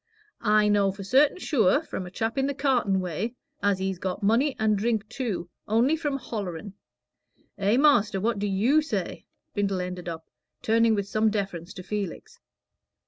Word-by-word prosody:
I 210 -1 +4
know 205 -1 +3
for 195 +1 -8
certain 270 - +4
sure, 280 - +2
from 185 - -5
a - - -7
chap 225 +4 -2
in 270 0 +1
the 280 - -2
cartin' 250 -9 +1
way, 185 +7 -3 0.3
as 200 -1 +2
he's 190 -1 -3
got 185 +2 -4
money 245 +7 +3
and 215 -1 +2
drink 220 0 0
too, 215 -10 -3 0.2
only 235 +8 +3
for 295 -3 -2
hollering. 200 -7 -5 0.9
Eh, 200 +4 +3
master, 260 -9 +4
what 220 +1 0
do 205 - -1
you 225 +11 +3
say?" 300 - -4 0.3
Brindle 200 -2 0
ended, 180 -1 -4 0.5
turning 225 0 +3
with 200 -1 -2
some 215 +2 +2
deference 195 -5 -3
to 185 - -8
Felix. 200 -2 -5
210 Hz, 165 wpm, -26 LUFS, 195-240 Hz, 0.9 s, I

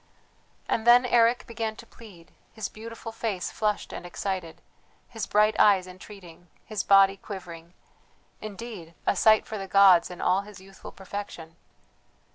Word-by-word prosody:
And 225 +1 -2
then 245 +1 +7
Eric 235 -1 +3
began 225 -1 -4
to - - -13
plead, 190 -8 -16 0.2
his 220 -2 -5
beautiful 225 +1 -9
face 215 -5 -4
flushed 210 -1 -2
and - - -7
excited, 175 -1 -5 0.5
his 225 -3 -6
bright 210 +1 +3
eyes 195 -3 +5
entreating, 180 -2 -13 0.2
his 215 -3 -3
body 195 0 +5
quivering; 175 -4 -10 0.7
indeed, 210 -6 -9
a - - +2
sight 215 +2 +4
for 215 - -6
the 195 - -6
gods 190 -3 +5
in 180 - -10
all 185 +2 +1
his 205 -1 -13
youthful 195 +1 -13
perfection. 190 -4 -8
200 Hz, 145 wpm, -26 LUFS, 185-220 Hz, 0.7 s, then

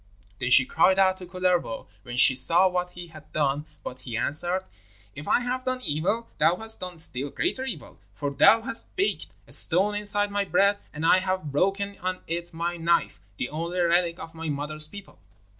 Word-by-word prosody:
Then 125 - -1
she 130 +1 +6
cried 185 +7 +2
out 190 -1 +3
to 180 - -10
Kullervo, 180 -9 -2 0.2
when 120 -1 -8
she 130 - +6
saw 170 +8 +6
what 180 -1 -2
he 175 -1 -10
had 155 -1 -15
done, 145 0 -1 0.2
but 125 - -8
he 125 -3 -6
answered: 175 +9 0 0.5
'If 145 +2 -10
I - - +2
have 250 +1 -3
done 255 0 -3
evil 180 +9 -2
thou 170 - +3
hast 220 +3 -1
done 180 -2 -8
still 140 -3 +1
greater 265 - -2
evil, 180 - -7 0.2
for 145 -1 -4
thou 220 +11 +4
hast 235 -1 -2
baked 390 +2 -1 0.2
a - - -18
stone 195 +5 +6
inside 205 0 +1
my 205 0 -1
bread, 200 +1 +2
and 155 +2 -5
I 185 - +5
have 185 -5 -3
broken 195 +6 -1
on 185 0 -4
it 170 +1 -4
my 170 +1 -4
knife, 170 +1 0 0.2
the 125 - -3
only 170 +4 -4
relic 170 0 +1
of 160 0 -10
my 165 -1 -6
mother's 150 +1 -2
people.' 200 +4 -13
175 Hz, 195 wpm, -25 LUFS, 155-195 Hz, 0.5 s, she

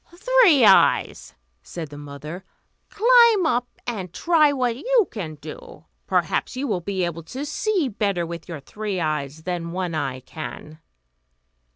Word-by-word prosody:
"Three 410 - +5
Eyes," 195 -2 +3 0.3
said 160 - -7
the 145 - -9
mother, 145 +5 -8 0.5
"climb 465 -3 +5
up, 245 -5 +1 0.2
and 195 -7 -4
try 310 - +3
what 250 -4 0
you 470 - +2
can 170 -9 -6
do; - - -11 0.2
perhaps - - 0
you 265 +2 -3
will 190 -6 -1
be 190 +1 -2
able 170 -1 -5
to 265 - -6
see 375 0 0
better 200 -6 -1
with 170 +2 -8
your 165 -3 -6
three 205 +5 -4
eyes 155 -1 -3
than 170 -1 -4
One 180 -2 -3
Eye 130 -4 -3
can." 155 +2 -9
195 Hz, 150 wpm, -23 LUFS, -, 0.5 s, Three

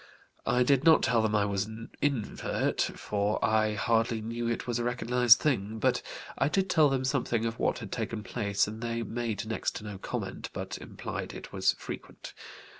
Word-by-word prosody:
I 125 +1 +4
did 135 +1 +3
not 160 -1 +6
tell 115 -2 +3
them 110 -1 +1
I 105 -1 +3
was 100 -1 0
an 110 +1 -9
'invert,' 135 -7 0
for 105 0 -1
I 110 -1 +2
hardly 115 +1 +1
knew 115 +2 -3
it 120 - -2
was 120 -1 -1
a - - -1
recognized 120 0 +5
thing, 110 -7 0
but 110 - +2 0.4
I - - +3
did 190 +3 +1
tell 155 -3 +5
them 130 -1 0
something 120 -4 0
of 115 0 -3
what - - +1
had 105 -5 -8
taken 115 -2 -3
place, 100 -4 0
and 110 +2 -7
they 115 0 -2
made 115 -1 -3
next 110 0 -2
to - - -6
no 105 -3 -7
comment, - - -4
but - - -5
implied - - -6
it - - -9
was - - +3
frequent. - - -8
115 Hz, 190 wpm, -29 LUFS, 110-125 Hz, 0.4 s, not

